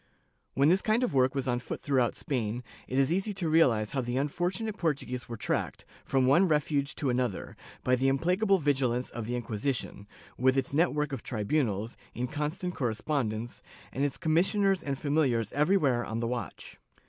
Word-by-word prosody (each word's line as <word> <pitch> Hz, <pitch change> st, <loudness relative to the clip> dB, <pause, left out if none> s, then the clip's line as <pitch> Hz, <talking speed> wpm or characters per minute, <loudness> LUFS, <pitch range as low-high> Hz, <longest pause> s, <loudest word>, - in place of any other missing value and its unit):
^ -, -, -37 dB, 0.5 s
When 140 Hz, +3 st, +4 dB
this 185 Hz, +3 st, +4 dB
kind 225 Hz, +3 st, +2 dB
of 250 Hz, -, 0 dB
work 130 Hz, 0 st, +3 dB
was 135 Hz, -1 st, -1 dB
on 120 Hz, -1 st, +1 dB
foot -, -, -6 dB
throughout 130 Hz, -4 st, +1 dB
Spain, 120 Hz, -3 st, -2 dB, 0.2 s
it 130 Hz, -, -2 dB
is 135 Hz, +4 st, +3 dB
easy 195 Hz, +3 st, -1 dB
to 180 Hz, -3 st, -2 dB
realize 125 Hz, -10 st, +3 dB
how 135 Hz, -2 st, 0 dB
the 120 Hz, +1 st, -2 dB
unfortunate 180 Hz, +9 st, -1 dB
Portuguese 135 Hz, -, -2 dB
were 115 Hz, -, -5 dB
tracked, -, -, -2 dB, 0.2 s
from 135 Hz, -1 st, +2 dB
one 170 Hz, +9 st, +5 dB
refuge 150 Hz, -2 st, 0 dB
to 135 Hz, -4 st, 0 dB
another, 125 Hz, -5 st, -2 dB, 0.3 s
by 125 Hz, -, +3 dB
the 130 Hz, +2 st, +1 dB
implacable 180 Hz, +9 st, +2 dB
vigilance 130 Hz, -5 st, 0 dB
of 115 Hz, -2 st, -5 dB
the 125 Hz, +1 st, -1 dB
Inqui 110 Hz, -2 st, -5 dB
sition, 120 Hz, -5 st, -3 dB, 0.3 s
with 130 Hz, +2 st, +3 dB
its 135 Hz, 0 st, 0 dB
net 165 Hz, +4 st, +3 dB
work 150 Hz, -1 st, -1 dB
of 130 Hz, -, -3 dB
tribunals, 110 Hz, -2 st, -1 dB, 0.2 s
in 125 Hz, +1 st, -2 dB
constant 155 Hz, +5 st, -3 dB
correspondence, 120 Hz, -2 st, -2 dB, 0.3 s
and 135 Hz, -, -2 dB
its 145 Hz, -2 st, 0 dB
commissioners 190 Hz, +3 st, +2 dB
and 140 Hz, -4 st, -3 dB
familiars 135 Hz, -7 st, +1 dB
everywhere 145 Hz, -5 st, +2 dB
on 115 Hz, 0 st, -4 dB
the 115 Hz, -, -1 dB
watch. 120 Hz, +1 st, -5 dB
135 Hz, 185 wpm, -29 LUFS, 120-160 Hz, 0.5 s, one